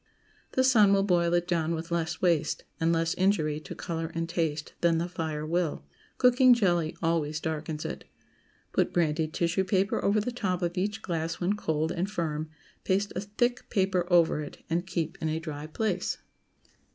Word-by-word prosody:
The 260 Hz, -, +3 dB
sun 215 Hz, -6 st, +6 dB
will 195 Hz, 0 st, +3 dB
boil 175 Hz, -3 st, +2 dB
it 175 Hz, 0 st, +1 dB
down 165 Hz, -2 st, 0 dB
with 165 Hz, +2 st, -6 dB
less 165 Hz, -1 st, -2 dB
waste, 165 Hz, -4 st, +2 dB, 0.2 s
and 165 Hz, +1 st, +2 dB
less 165 Hz, 0 st, +1 dB
injury 160 Hz, -6 st, +1 dB
to 155 Hz, -, -9 dB
color 165 Hz, -1 st, -4 dB
and 165 Hz, 0 st, -1 dB
taste, 160 Hz, -3 st, -2 dB
than 170 Hz, -1 st, +3 dB
the 170 Hz, +1 st, -1 dB
fire 160 Hz, -3 st, -3 dB
will. 165 Hz, -, -1 dB, 0.3 s
Cooking 250 Hz, 0 st, +6 dB
jelly 175 Hz, -8 st, +1 dB
always 155 Hz, -2 st, 0 dB
darkens 155 Hz, -1 st, -4 dB
it. -, -, -5 dB, 0.7 s
Put -, -, +1 dB
brandied 160 Hz, -2 st, +1 dB
tissue 170 Hz, +3 st, +1 dB
paper 190 Hz, +1 st, +1 dB
over 205 Hz, +2 st, +3 dB
the 220 Hz, +4 st, -2 dB
top 185 Hz, -7 st, -2 dB
of 175 Hz, 0 st, -1 dB
each 205 Hz, +4 st, -2 dB
glass 165 Hz, -2 st, -2 dB
when 185 Hz, +3 st, +1 dB
cold 160 Hz, -5 st, -1 dB
and 185 Hz, +3 st, -1 dB
firm, 155 Hz, -6 st, -2 dB, 0.3 s
paste 200 Hz, +2 st, 0 dB
a 185 Hz, -, -1 dB
thick 240 Hz, +5 st, -1 dB
paper 190 Hz, -4 st, +1 dB
over 170 Hz, -3 st, +4 dB
it, 150 Hz, -, -9 dB
and 175 Hz, +2 st, 0 dB
keep 165 Hz, -3 st, -3 dB
in 160 Hz, -, 0 dB
a 155 Hz, -, -1 dB
dry 155 Hz, -2 st, -6 dB
place. 185 Hz, +2 st, -1 dB
170 Hz, 180 wpm, -28 LUFS, 160-190 Hz, 0.7 s, sun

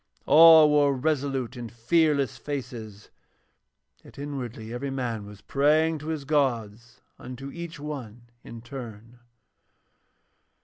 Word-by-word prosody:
All 160 Hz, 0 st, +8 dB
wore 145 Hz, -2 st, +3 dB
resolute 135 Hz, -3 st, -1 dB
and 120 Hz, -2 st, -7 dB
fearless 140 Hz, +2 st, +1 dB
faces, 120 Hz, -7 st, -7 dB, 0.9 s
yet -, -, -17 dB
inwardly 125 Hz, -6 st, -6 dB
every 130 Hz, +3 st, -4 dB
man 120 Hz, -6 st, -4 dB
was 105 Hz, -1 st, -13 dB
praying 155 Hz, +5 st, +2 dB
to 150 Hz, -, -9 dB
his 155 Hz, -3 st, -4 dB
gods, 120 Hz, -6 st, -2 dB, 0.2 s
unto 130 Hz, +2 st, -8 dB
each 170 Hz, -2 st, -8 dB
one 130 Hz, -6 st, -7 dB, 0.2 s
in 115 Hz, -1 st, -10 dB
turn. 120 Hz, -3 st, -10 dB
135 Hz, 115 wpm, -26 LUFS, 115-150 Hz, 0.9 s, All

